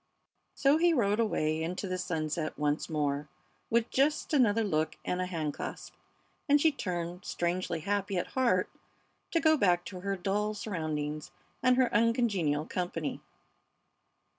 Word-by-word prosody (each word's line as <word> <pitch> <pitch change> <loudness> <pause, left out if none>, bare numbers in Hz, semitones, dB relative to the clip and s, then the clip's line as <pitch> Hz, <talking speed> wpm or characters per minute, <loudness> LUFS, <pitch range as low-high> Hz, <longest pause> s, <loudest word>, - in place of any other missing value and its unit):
So 275 +2 +4
he 340 +1 +4
rode 210 -6 +2
away 155 -8 +1
into 180 +4 -3
the 185 0 -2
sunset 155 -2 -2
once 150 0 0
more 145 -2 -1 0.4
with 230 0 +1
just 295 +4 +1
another 230 -5 +4
look 155 -6 0
and 180 0 -1
a 185 - -1
hand 160 -5 -2
clasp, - - -6 0.6
and 290 +1 +6
she 320 +2 +4
turned, 180 - -4
strangely 175 -1 -2
happy 200 +1 -1
at 175 - 0
heart, 235 -9 +2 0.6
to 335 - +2
go 315 -1 +5
back 180 - +2
to 185 - -7
her 195 +2 -2
dull 205 +3 -1
surroundings 155 -7 -3 0.3
and 255 -1 +4
her 255 -2 +3
uncongenial 210 - +2
company. 175 -4 -3
185 Hz, 145 wpm, -30 LUFS, 160-230 Hz, 0.6 s, and